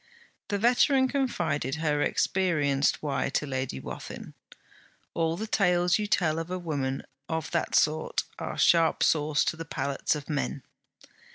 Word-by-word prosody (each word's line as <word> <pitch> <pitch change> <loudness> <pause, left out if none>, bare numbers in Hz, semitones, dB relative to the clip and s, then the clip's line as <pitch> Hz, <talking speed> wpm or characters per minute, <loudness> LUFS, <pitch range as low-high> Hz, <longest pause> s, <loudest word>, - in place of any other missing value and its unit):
The 205 - -1
veteran 255 +4 +4
confided 175 - -1
her 150 -2 0
experienced 150 -10 +1
why 145 -2 -1
to 145 - -1
Lady 130 - -3
Wathin: - - -8 0.8
'All 165 0 0
the 215 - -3
tales 180 -3 +2
you 210 - -1
tell 165 -6 +1
of 165 +1 -5
a 185 - -2
woman 140 -6 -3 0.3
of 160 -1 -3
that 170 - -1
sort 155 +1 +2 0.2
are - - -5
sharp 165 -1 +4
sauce 150 -1 +2
to - - 0
the 165 - -6
palates 140 -1 -1
of 150 -1 -7
men.' 140 -3 -2
160 Hz, 150 wpm, -28 LUFS, 145-180 Hz, 0.8 s, veteran